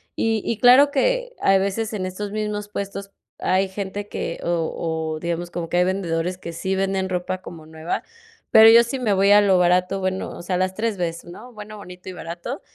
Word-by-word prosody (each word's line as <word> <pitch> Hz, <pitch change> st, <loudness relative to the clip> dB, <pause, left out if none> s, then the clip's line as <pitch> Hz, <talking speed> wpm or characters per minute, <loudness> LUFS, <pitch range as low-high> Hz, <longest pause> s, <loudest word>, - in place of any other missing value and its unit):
Y 225 Hz, -2 st, 0 dB
y 230 Hz, -, -1 dB
claro 260 Hz, +4 st, +7 dB
que -, -, 0 dB
hay 195 Hz, -, +4 dB
veces 205 Hz, +3 st, -2 dB
en 195 Hz, -3 st, -3 dB
estos 200 Hz, +2 st, -5 dB
mismos 210 Hz, -1 st, -3 dB
puestos 200 Hz, -1 st, -5 dB, 0.3 s
hay 190 Hz, +1 st, +1 dB
gente 200 Hz, +1 st, -5 dB
que -, -, -4 dB
o 160 Hz, -1 st, -2 dB
o, -, -, -9 dB
digamos, 170 Hz, 0 st, -3 dB
como 170 Hz, -2 st, -5 dB
que 175 Hz, -, 0 dB
hay 180 Hz, -, +5 dB
vendedores 180 Hz, -1 st, -2 dB
que 170 Hz, -2 st, -8 dB
sí 190 Hz, +3 st, -2 dB
venden 190 Hz, 0 st, -1 dB
ropa 185 Hz, +1 st, -3 dB
como 165 Hz, -4 st, -11 dB
nueva, 160 Hz, +1 st, -4 dB, 0.5 s
pero 220 Hz, 0 st, +9 dB
yo 230 Hz, +1 st, +8 dB
sí 265 Hz, +3 st, -4 dB
me 225 Hz, -5 st, 0 dB
voy 195 Hz, +1 st, +3 dB
a 205 Hz, 0 st, +7 dB
lo 195 Hz, -2 st, +4 dB
barato, 180 Hz, +2 st, +2 dB
bueno, 190 Hz, 0 st, -2 dB
o -, -, -8 dB
sea, 180 Hz, +1 st, -2 dB
las 185 Hz, +1 st, 0 dB
3 220 Hz, -1 st, -2 dB
bes, 170 Hz, -1 st, -3 dB
¿no? 215 Hz, +8 st, -11 dB
Bueno, 215 Hz, 0 st, -10 dB
bonito 180 Hz, -2 st, -12 dB
y -, -, -7 dB
barato. 175 Hz, -, -6 dB
190 Hz, 210 wpm, -22 LUFS, 175-210 Hz, 0.5 s, pero